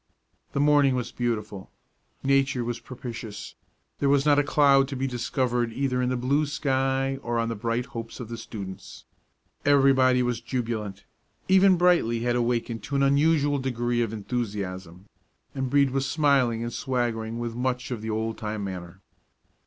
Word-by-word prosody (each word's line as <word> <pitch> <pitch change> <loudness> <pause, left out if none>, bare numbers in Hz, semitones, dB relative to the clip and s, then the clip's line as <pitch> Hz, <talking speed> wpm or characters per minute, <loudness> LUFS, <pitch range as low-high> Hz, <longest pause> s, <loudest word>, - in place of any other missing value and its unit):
The - - -1
morning 145 -2 +4
was 125 -2 -3
beautiful. 110 -5 -3 0.5
Nature 135 -2 +2
was 120 0 -3
propitious; 115 -5 -8 0.5
there 140 - +2
was 140 0 +3
not 145 -1 +5
a - - +3
cloud 140 -1 +4
to 140 - -5
be 135 +1 -2
discovered 125 -1 -1
either 125 0 -1
in 125 - +1
the 125 - 0
blue 140 +5 +1
sky 135 -2 0
or 120 -1 -2
on 115 0 0
the 115 - -3
bright 115 +3 -2
hopes 115 -4 -8
of 125 - -6
the 115 - -6
students. 100 -4 -8 0.6
Everybody 135 -3 +4
was 120 -1 -1
jubilant. 110 -6 -4 0.4
Even 190 0 +5
Brightly 170 -10 +3
had 120 0 0
awakened 120 -1 -1
to 140 - -4
an 140 - +3
unusual 145 +1 +3
degree 120 -2 -1
of 115 -3 -1
enthusiasm, 100 -5 -4 0.5
and 130 -2 -2
Brede 140 0 +3
was 135 +1 -1
smiling 130 -5 +2
and 120 0 -4
swaggering 115 -3 -2
with 120 -1 -3
much 125 +2 -2
of 120 -4 -3
the 110 - -5
old 110 +1 -2
time 105 -1 -4
manner. 95 -1 -7
125 Hz, 165 wpm, -26 LUFS, 115-135 Hz, 0.6 s, not